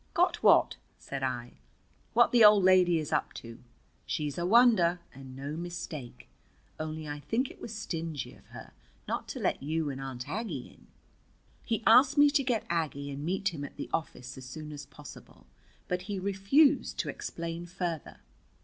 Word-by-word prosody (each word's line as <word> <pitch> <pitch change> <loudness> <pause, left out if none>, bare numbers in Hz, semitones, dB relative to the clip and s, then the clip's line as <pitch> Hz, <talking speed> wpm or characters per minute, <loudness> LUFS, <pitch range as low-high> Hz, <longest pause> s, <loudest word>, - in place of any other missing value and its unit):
"Got - - +2
what?" - - +5 0.2
said 140 -1 -6
I. 125 -2 -4 0.5
"What 240 +1 +5
the 240 -2 +6
old 210 -2 +8
lady 180 -2 +5
is 155 -2 -3
up - - 0
to. 115 0 -10 0.5
She's 150 -2 -2
a 175 - -1
wonder, 205 -6 +5
and 130 -1 -11
no 140 +3 -5
mistake. 165 -6 -7 0.5
Only 155 0 -5
I 145 0 -5
think 225 - -1
it - - -17
was 230 - -7
stingy 165 - -5
of - - -20
her - - -11 0.4
not - - -3
to - - -6
let - - 0
you 155 +1 -1
and 135 0 -7
Aunt 130 -2 -6
Aggie 225 +2 -4
in." - - -22 0.8
He 230 -1 -2
asked 260 +5 +6
me 290 0 +7
to 285 -2 +2
get 245 -4 0
Aggie 150 -4 -2
and 140 +1 -6
meet 190 +2 -1
him 145 -3 -6
at 145 - -8
the - - -6
office 130 -5 -4
as 130 - -10
soon 150 +3 -8
as 145 -1 -8
possible, 60 - -13 0.4
but 180 0 -1
he 200 - -2
refused 200 +10 +2
to - - -2
explain 170 +1 -5
further. 175 -3 -5
170 Hz, 175 wpm, -30 LUFS, 145-205 Hz, 0.8 s, old